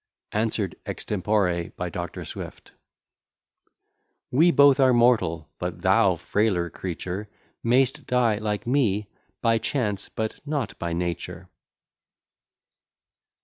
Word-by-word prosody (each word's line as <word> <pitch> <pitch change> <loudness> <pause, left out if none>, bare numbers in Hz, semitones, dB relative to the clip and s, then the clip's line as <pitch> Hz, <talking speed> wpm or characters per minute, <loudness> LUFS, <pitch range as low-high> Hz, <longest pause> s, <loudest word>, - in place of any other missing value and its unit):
ANSWERED 105 -3 -1
EXTEMPORE 95 -4 -1
BY - - -3
DR. - - -5
SWIFT - - -8 1.6
We 160 +7 +5
both 140 -4 +6
are 130 -1 +5
mortal; 110 - +3
but - - -4
thou, - - +4
frailer 95 -5 0
creature, 95 +4 -5 0.3
May'st 130 +4 +2
die, 120 -4 +2
like 105 -1 -2
me, 115 -6 +1 0.4
by 115 -1 +3
chance, 110 -4 -2
but 110 -1 -4
not 145 -8 -3
by 85 0 -2
nature. 90 +1 -4
105 Hz, 105 wpm, -25 LUFS, 90-125 Hz, 1.6 s, both